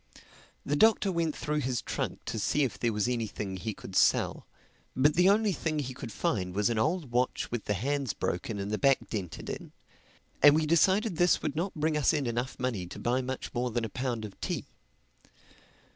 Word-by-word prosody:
The 145 - 0
Doctor 215 +2 +4
went 165 -3 0
through 150 0 -1
his 130 -4 -1
trunk - - -4
to 110 - -3
see 145 +8 +1
if 130 - -2
there 115 - +1
was 105 +1 0
anything 110 -5 -3
he 105 +2 -4
could 95 - -10
sell. - - +2 0.5
But 145 +4 +4
the 180 +3 +5
only 210 +1 +3
thing 160 -2 -2
he 130 -3 -3
could 120 - -7
find 90 -5 -1
was 105 +3 +2
an 115 - 0
old 155 +1 0
watch 125 +1 0
with 120 -2 -3
the 105 - 0
hands 135 +3 -1
broken 100 +5 -3
and 100 +1 -4
the 105 - -1
back 135 -2 +2
dented 95 -7 -5
in; - - -6 0.7
and 145 +1 +8
we 155 0 +2
decided 185 +4 +3
this 175 -1 +3
would 145 - -2
not 180 +5 -2
bring 155 0 0
us 150 +2 +3
in 145 -3 0
enough 120 +2 -2
money 115 -8 -2
to - - -9
buy 125 +2 0
much 130 0 -5
more 125 0 0
than 120 0 -1
a - - -5
pound 125 -3 -3
of 100 - -12
tea. - - -2
130 Hz, 205 wpm, -29 LUFS, 110-155 Hz, 0.7 s, and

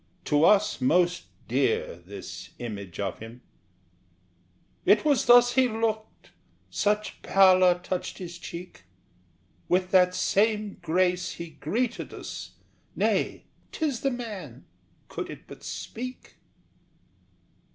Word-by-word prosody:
To 150 +1 +3
us 210 +1 +4
most 175 +6 +2 0.2
dear 485 +2 0
This - - -9
image 100 -7 -7
of 100 -2 -3
him! 115 +2 -10 1.4
"It 210 - +4
was 290 -4 +2
thus 245 0 +7
He 260 -1 +4
looked; 220 -1 -3 0.4
such 210 +1 -1
pallor 185 -2 +5
touched 180 0 -3
his 175 -1 -8
cheek; 175 - -9 0.8
With 180 0 +1
that 180 -1 +5
same 210 0 +1
grace 180 +1 +1
he 170 -1 -8
greeted 220 +11 -3
us - - -8 0.4
Nay, - - 0 0.3
'tis 295 -7 -2
the 275 - +2
man, 205 - -7 0.4
could - - -5
it - - -9
but - - -12
speak!" 255 +2 -7
185 Hz, 110 wpm, -27 LUFS, 170-225 Hz, 1.4 s, thus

